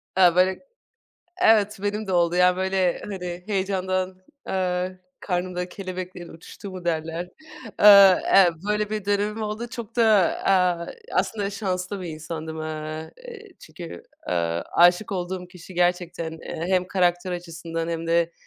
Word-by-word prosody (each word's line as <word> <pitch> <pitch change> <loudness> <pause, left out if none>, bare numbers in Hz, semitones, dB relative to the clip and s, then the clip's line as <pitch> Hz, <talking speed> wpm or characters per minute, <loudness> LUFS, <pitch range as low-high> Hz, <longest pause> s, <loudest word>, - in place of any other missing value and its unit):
Aaa, 180 -2 +5
böyle 185 +1 +3 0.8
evet, 215 - +4
benim 210 +1 -2
de 190 - -3
oldu, 175 -1 +2
yani, 180 0 +4
böyle, 190 -1 +1
hani, 180 -3 -5
heyecandan, 185 -2 -1 0.3
aaa, 180 -1 -1 0.3
karnımda 180 -1 -2
kelebeklerin 185 -2 -7
uçuştuğu 165 +4 -10
mu 185 -1 -9
derler? 165 +1 -2 0.5
Iıı, 200 -2 +9
eee, 190 -3 +6 0.2
böyle 210 0 0
bir 215 -2 -3
dönemim 205 +2 0
oldu. 215 +2 -4
Çok 235 -2 -8
da, 235 - +4 0.4
aaa, 180 -3 +2 0.3
aslında 200 +1 0
şanslı 195 -1 -3
bir 180 - -6
insandım. 160 0 -6
Iıı, 155 0 -5 0.2
eee, 435 -4 -11
çünkü, 160 - -10 0.3
ııı, 85 -1 0
aşık 175 +4 +4
olduğum 180 0 -4
kişi 180 0 -13
gerçekten, 175 -2 0
eee, 160 +1 -6
hem 185 -1 +2
karakter 180 -1 +1
açısından 165 -1 -5
hem 165 0 -3
de 170 0 +2
180 Hz, 140 wpm, -24 LUFS, 170-195 Hz, 0.8 s, Iıı